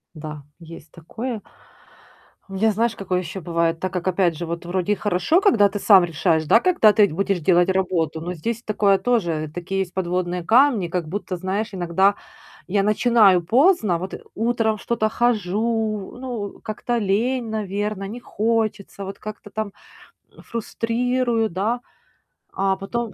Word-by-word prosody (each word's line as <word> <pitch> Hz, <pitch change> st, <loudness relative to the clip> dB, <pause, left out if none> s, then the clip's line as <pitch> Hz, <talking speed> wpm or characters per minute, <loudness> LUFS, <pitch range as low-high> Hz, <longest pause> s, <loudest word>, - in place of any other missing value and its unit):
Да, 150 Hz, -1 st, -8 dB, 0.2 s
есть 165 Hz, -2 st, -12 dB
такое. 220 Hz, +7 st, -6 dB, 1.1 s
У -, -, -9 dB
меня, 220 Hz, +3 st, +2 dB
знаешь, 225 Hz, +2 st, 0 dB
какое 185 Hz, -2 st, -2 dB
еще 185 Hz, +2 st, -6 dB
бывает. 165 Hz, 0 st, 0 dB
Так 185 Hz, +1 st, -3 dB
как, 180 Hz, -1 st, -3 dB
опять 180 Hz, -3 st, +2 dB
же, 170 Hz, -, -4 dB
вот 170 Hz, +1 st, -5 dB
вроде 185 Hz, +2 st, -1 dB
и -, -, -1 dB
хорошо, 210 Hz, -, +1 dB
когда 220 Hz, -, +5 dB
ты 205 Hz, +1 st, -5 dB
сам 195 Hz, -3 st, +6 dB
решаешь, 160 Hz, -1 st, 0 dB
да, 225 Hz, -, +5 dB
когда 290 Hz, -, +4 dB
ты 205 Hz, -3 st, +4 dB
будешь 195 Hz, +3 st, 0 dB
делать 175 Hz, +2 st, +3 dB
работу, 175 Hz, -4 st, 0 dB
но 175 Hz, +2 st, -4 dB
здесь 230 Hz, +8 st, -4 dB
такое 200 Hz, -2 st, +2 dB
тоже 170 Hz, -11 st, 0 dB
Такие 180 Hz, +2 st, -3 dB
есть 185 Hz, -2 st, -3 dB
подводные 180 Hz, -1 st, -2 dB
камни, 230 Hz, -3 st, +4 dB
как 170 Hz, -1 st, -3 dB
будто, 185 Hz, +1 st, -4 dB
знаешь, 195 Hz, +5 st, -2 dB
иногда 190 Hz, +3 st, +2 dB, 0.5 s
я 195 Hz, +1 st, +1 dB
начинаю 210 Hz, -3 st, +4 dB
поздно. 230 Hz, -, +3 dB
Вот, 185 Hz, +3 st, -6 dB
э, -, -, -7 dB
утром 225 Hz, -1 st, 0 dB
что-то 215 Hz, 0 st, -1 dB
хожу, 220 Hz, -1 st, -1 dB
ну, 235 Hz, -6 st, -5 dB
как-то 230 Hz, +2 st, -3 dB
лень, 230 Hz, +4 st, 0 dB
наверно, 205 Hz, -1 st, -3 dB
не 230 Hz, +5 st, -7 dB
хочется. 215 Hz, -3 st, -2 dB
Вот, 195 Hz, 0 st, -7 dB
как-то 210 Hz, -1 st, -9 dB
там, 210 Hz, -1 st, -4 dB, 0.6 s
м, -, -, -14 dB
фрустрирую, 235 Hz, 0 st, -1 dB
да. 215 Hz, +7 st, -1 dB, 0.7 s
А 195 Hz, 0 st, 0 dB
потом 220 Hz, +4 st, -4 dB
200 Hz, 160 wpm, -22 LUFS, 180-225 Hz, 1.1 s, сам